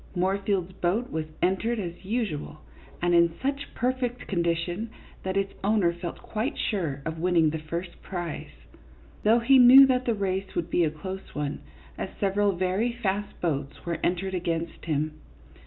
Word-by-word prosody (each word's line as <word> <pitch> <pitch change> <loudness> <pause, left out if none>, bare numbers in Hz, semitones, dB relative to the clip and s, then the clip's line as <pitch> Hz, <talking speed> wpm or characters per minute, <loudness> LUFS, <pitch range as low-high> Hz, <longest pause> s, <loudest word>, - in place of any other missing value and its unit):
Moorfield's 190 0 0
boat 205 +9 -1
was 160 -1 -2 0.2
entered, 190 +6 +1
as 175 -4 -5
usual, 190 -9 -3 0.4
and 175 0 +3
in 170 -1 +4
such 280 +1 -2
perfect 250 -1 -1
con 180 -4 0
dition 170 +5 -1 0.3
that 190 +1 -2
its 195 0 0
owner 200 -4 +3
felt 170 0 -6
quite 230 +7 -2
sure 160 - -2
of 160 0 -3
winning 170 -3 +3
the 160 - -3
first 170 +3 -6
prize, 175 -4 -5 0.7
though 220 +2 +5
he 260 +3 +5
knew 255 +2 +10
that 255 -1 +1
the 235 - +1
race 190 -1 -2
would 170 0 -2
be 175 - +3
a 160 - +3
close 185 +6 -7
one, 145 -1 -2 0.4
as - - -3
several 200 0 +2
very 185 +6 0
fast 205 -3 -2
boats 145 -5 -2
were 170 -1 -2
entered 185 +2 0
against 170 -2 -2
him. 155 -1 -1
185 Hz, 165 wpm, -27 LUFS, 170-215 Hz, 0.7 s, knew